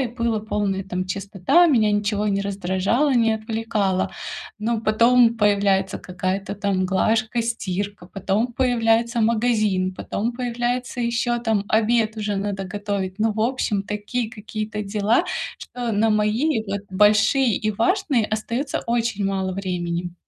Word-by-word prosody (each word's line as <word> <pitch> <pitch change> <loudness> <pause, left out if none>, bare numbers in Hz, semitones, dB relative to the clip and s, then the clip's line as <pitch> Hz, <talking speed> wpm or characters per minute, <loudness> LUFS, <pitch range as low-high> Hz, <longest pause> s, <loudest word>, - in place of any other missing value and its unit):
и 260 - +1
была 235 -2 -1
полная, 200 -3 -2
там, 185 -1 -3
чистота, 195 - +2
меня 220 -8 +3
ничего 205 0 0
не 200 0 +1
раздражало, 200 +8 0
не 225 -2 +3
отвлекало. 220 -3 -1 0.5
Но 225 +1 -1
потом 235 +2 +4
появляется 200 -2 +2
какая-то 185 +2 -3
там 195 -2 0
глажка, 220 +4 +1
стирка, 200 -4 -3
потом 200 +5 -1
появляется 235 -2 +2
магазин, 215 -5 +1
потом 225 +6 -3
появляется 245 +1 -2
ещё 235 0 0
там 220 -4 0
обед 220 0 +2
уже 210 -1 -2
надо 195 -1 -3
готовить, 200 -1 -4
ну, 220 -1 +1
в 220 - -2
общем, 225 -5 0
такие 210 +3 -3
какие-то 215 0 -5
дела, 205 +2 +1 0.3
что 245 -2 -5
на 215 +2 +2
мои 220 +5 +1
вот 195 0 -3
большие 215 +5 +4
и 215 - -1
важные 245 - +1
остается 230 +6 -2
очень 230 -4 0
мало 190 -1 -1
времени. 175 -2 -3
215 Hz, 135 wpm, -22 LUFS, 195-235 Hz, 0.5 s, потом